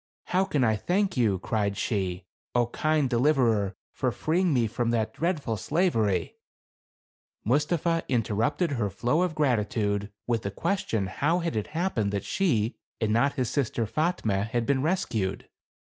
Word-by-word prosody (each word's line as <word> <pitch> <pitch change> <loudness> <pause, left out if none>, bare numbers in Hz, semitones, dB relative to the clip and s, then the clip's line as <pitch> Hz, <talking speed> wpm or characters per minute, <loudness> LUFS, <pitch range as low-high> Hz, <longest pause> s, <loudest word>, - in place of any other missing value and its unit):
"How 185 +2 +1
can 150 -8 +1
I 110 -2 +3
thank 190 - 0
you," 110 -7 +2
cried 100 +1 -1
she, 95 -4 -2
" - - -5
0, 120 - +4
kind 155 -2 +2
deliverer, 120 -6 +2 0.2
for 130 - 0
freeing 165 +9 +1
me 125 -5 +3
from 115 +2 -1
that 115 -2 0
dreadful 155 -10 -1
slavery! 110 - 0 0.5
" - - -63
Mustapha 155 - +1
interrupted 120 - +1
her 115 -7 0
flow 120 - 0
of 180 -3 0
gratitude, 105 -7 0
with 115 -2 0
the 100 - -3
question 110 - -1
how 145 - 0
had 170 -7 -2
it 105 - -1
happened 125 - 0
that 100 -1 -2
she 120 - +1 0.2
and 110 -2 +1
not 135 +5 +3
his 130 -4 -1
sister 120 -4 0
Fatme 110 - 0
had 115 +1 -1
been 135 +2 +1
rescued 120 - -1
120 Hz, 160 wpm, -27 LUFS, 105-155 Hz, 0.5 s, 0